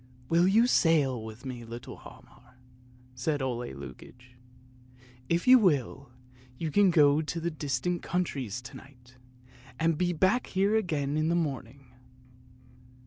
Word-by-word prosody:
" 125 0 -26
Will 170 +2 +4
you 220 +5 +4
sail 145 - +2
with 110 +4 -10
me, 125 -2 -6
little 115 +1 -9
Hialmar? - - -17 0.2
" 125 0 -27
said 145 +4 -2
Ole 125 -2 -3
Lukoie; 125 - -12 0.5
" 125 0 -26
if 175 - -3
you 255 0 +9
will, 140 - 0 0.5
you 160 +1 -3
can 200 +4 +4
go 150 -3 +4
to 165 +2 -3
distant 155 +4 -2
countries 130 - -3
to 120 - -10
night, 125 -2 -18 0.6
and 165 -1 +1
be 180 -1 +1
back 190 +9 +1
here 200 +3 +1
again 155 -9 -1
in 155 +1 +1
the 170 - +1
morning! 135 -5 -4
140 Hz, 145 wpm, -28 LUFS, 125-170 Hz, 0.6 s, you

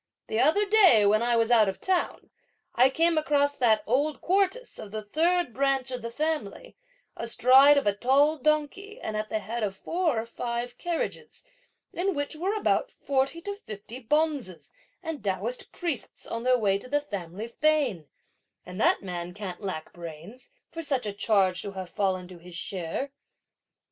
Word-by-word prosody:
The 220 - 0
other 320 +11 +4
day, 390 - +6
when 215 +2 +4
I 240 0 +2
was 230 0 +2
out 220 -4 +5
of 190 - -6
town, 375 -2 -1 0.4
I 255 +2 +5
came 330 +3 +2
across 285 -2 +1
that 220 -4 +3
old 285 +6 0
Quartus 395 +7 0
of 210 - -8
the 215 +1 -5
third 330 +5 +1
branch 270 0 0
of 250 -1 -4
the 230 - -5
family, 310 - -3 0.4
astride 260 +5 +5
of 280 - +1
a 205 - +3
tall 275 +8 +3
donkey, 305 - -1
at 215 0 -4
the - - 0
head 220 +3 -4
of 200 -3 -2
four 330 - 0
or 225 - -4
five 235 +1 -4
carriages, 345 -2 -4 0.5
in 380 +2 -1
which 285 +2 -3
were 375 +7 -1
about 430 +3 +1
forty 275 +4 -1
to 405 +4 -4
fifty 220 - -9
bonzes 285 - -1 0.3
and 320 -8 -5
Taoist 205 +5 -3
priests 335 -7 -4
on 230 - -4
their 255 +1 +3
way 200 -4 +1
to 255 - -11
the 290 +2 +2
family 200 - -6
fane, 260 - +1 0.6
and 180 +4 -6
that - - +3
man 175 -1 -5
can't 195 -3 -6
lack 185 -6 -5
brains, 170 - -10 0.2
for 330 - -5
such 270 -6 -1
a 205 - -3
charge 195 -3 +2
to 200 - -6
have 185 -2 -7
fallen 190 -3 -1
to 180 -1 -12
his 175 0 -12
share!" 185 +9 -4
245 Hz, 175 wpm, -27 LUFS, 205-305 Hz, 0.6 s, day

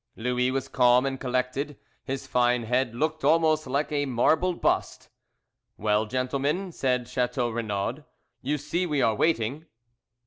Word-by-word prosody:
Louis 125 +2 0
was 135 +1 -2
calm 125 0 +4
and 135 -1 -2
collected, 130 +3 -2 0.3
his 135 0 -4
fine 125 -1 +2
head 120 +1 0
looked 155 +4 -1
almost 160 -1 +3
like 140 +3 -1
a 145 -1 0
marble 155 +8 +2
bust. - - -1 0.7
"Well, 105 +1 +1
gentlemen," 140 - -1
said 125 -5 -1
Chateau 125 -1 -1
Renaud, 115 +4 -3 0.4
"you 145 +3 -1
see 170 +5 -2
we 150 -4 +1
are 110 - +3
waiting." 145 +3 0
130 Hz, 140 wpm, -26 LUFS, 125-150 Hz, 0.7 s, calm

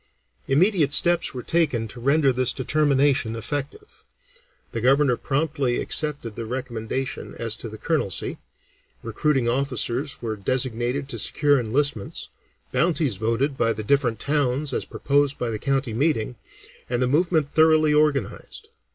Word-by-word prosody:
Immediate 155 0 +3
steps 175 +1 +5
were 125 -2 -7
taken 145 -9 0
to 120 - -9
render 140 +2 +3
this 125 0 +2
determination 140 -3 +1
effective; 145 - -6 0.7
the 115 - -3
Governor 135 +1 +4
promptly 140 -2 -1
accepted 145 -8 -1
the 115 -1 -6
recommendation 125 +1 -4
as 115 -2 -1
to 115 - -6
the 110 - -9
colonelcy, 110 - -2 0.6
recruiting 130 +3 0
officers 130 +2 -1
were 110 -2 -3
designated 125 +5 -2
to - - -3
secure 145 -2 +2
enlistments, 125 -1 -1 0.4
bounties 150 - +1
voted 115 +7 0
by 115 0 +2
the 110 0 -6
different 120 -2 +1
towns 140 0 0
as - - -2
proposed 140 0 0
by 120 -2 -2
the 110 - -4
county 135 -3 -1
meeting, 125 -2 0 0.5
and 120 -1 0
the 125 - +2
movement 155 0 +1
thoroughly 155 -1 +4
organized. 150 -8 -1
135 Hz, 135 wpm, -23 LUFS, 120-150 Hz, 0.7 s, steps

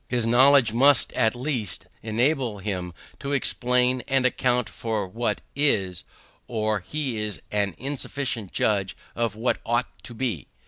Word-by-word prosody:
His 120 -2 0
knowledge 125 0 +6
must 135 +2 +4
at 110 +1 +2
least 120 - -2 0.2
enable 120 +1 0
him 95 -3 -4 0.3
to 140 +1 -3
explain 125 -1 +2
and 135 -1 +2
account 125 -1 +1
for 110 -5 -3
what 115 +5 -2
is, 100 - +1 0.4
or 110 -2 0
he 130 +5 -3
is 105 -1 -3
an 100 -4 0
insufficient 130 -5 -3
judge 100 -3 0 0.2
of 115 -3 -1
what 115 +3 -1
ought 120 +2 0
to 120 - -9
be. 110 - -3
120 Hz, 140 wpm, -25 LUFS, 105-130 Hz, 0.4 s, knowledge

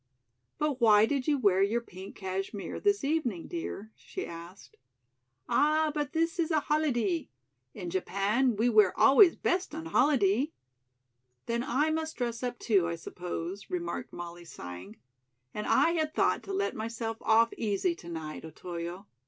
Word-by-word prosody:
"But 295 -4 -1
why 215 -2 +7
did 270 +1 -1
you 295 -2 +3
wear 200 -6 +3
your 210 +4 +2
pink 190 -4 -11
cashmere 195 +1 -4
this 405 -4 +2
evening, 275 - -1
dear?" 220 - -5
she 380 - -7
asked. 170 +3 -11 0.7
"Ah, 310 +1 +3
but 295 -2 -2
this 330 +2 0
is 325 - +1
a 315 -2 +3
holidee. 240 - 0 0.5
In 175 -2 -5
Japan 210 +7 +1
we 225 +4 +2
wear 215 -5 +4
always 340 +5 +7
best 360 -3 -1
on 325 +1 -6
holidee." 270 -3 +2 0.9
"Then 235 0 -1
I 285 +5 +1
must 315 0 -2
dress 235 -2 -2
up, 245 -1 -3
too, 195 -8 +2
I 170 - -2
suppose," 175 +3 -6
remarked 170 -1 -4
Molly, 175 0 -8
sighing, 90 - -9 0.6
"and 210 - -4
I 335 - +4
had 315 -2 -1
thought - - +2
to 395 - -6
let 395 +1 -1
myself 225 0 -4
off 225 +1 +4
easy 225 - 0
to 170 - -11
night, 160 -2 -6
Otoyo. 170 +3 -7
225 Hz, 155 wpm, -30 LUFS, 185-300 Hz, 0.9 s, why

